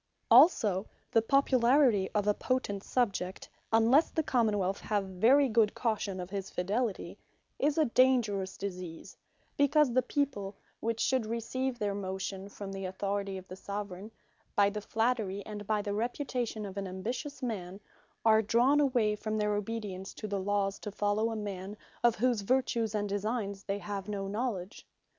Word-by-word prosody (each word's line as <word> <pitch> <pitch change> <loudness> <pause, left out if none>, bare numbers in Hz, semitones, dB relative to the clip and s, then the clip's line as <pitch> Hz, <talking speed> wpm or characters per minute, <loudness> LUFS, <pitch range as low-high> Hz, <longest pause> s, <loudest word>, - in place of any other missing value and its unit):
Popular - - +9
Men 250 - +12
Also, 210 - +2 0.2
the 225 - +4
Popularity 255 -4 +3
of 205 -1 +2
a 210 - +4
potent 205 -5 -2
Subject, 200 -6 -1 0.2
(unlesse 230 +8 +5
the 320 - -1
Common 230 -7 +2
wealth 195 0 -1
have 205 -2 -1
very 230 +10 +4
good 220 -3 +2
caution 215 -5 -1
of 180 +1 -6
his 195 -1 -4
fidelity,) 205 +4 -2 0.4
is 290 +2 +1
a 315 - +4
dangerous 230 -7 +2
Disease; 180 -4 -6 0.4
because 285 -2 +4
the 255 - +4
people 245 -7 -2 0.2
(which 230 0 -2
should 255 -3 +1
receive 245 +3 -2
their 205 -3 -1
motion 190 0 -4
from 200 -1 -7
the 195 0 -5
Authority 195 +1 -2
of 185 0 -10
the 185 - -8
Soveraign,) 200 0 -6 0.5
by 200 0 +4
the 210 +1 -4
flattery, 220 -3 -1
and 205 -1 -7
by 210 -1 +1
the 205 -1 -2
reputation 235 -1 -2
of 195 0 -8
an 195 -1 -3
ambitious 240 +10 -5
man, 195 -5 -4 0.5
are 220 -1 +6
drawn 245 +7 +3
away 245 -7 +2
from 215 +1 -3
their 210 0 +1
obedience 205 -2 -4
to 215 - -6
the 200 -1 -2
Lawes, 200 0 0
to 210 - -6
follow 205 +2 0
a 225 - -3
man, 200 -1 -5 0.3
of 235 -2 +5
whose 240 +2 +1
vertues, 235 -1 0
and 205 -1 0
designes 200 0 -2
they 200 0 -1
have 200 +1 -5
no 200 -1 -3
knowledge. 205 -2 -4
210 Hz, 170 wpm, -31 LUFS, 195-240 Hz, 0.5 s, Men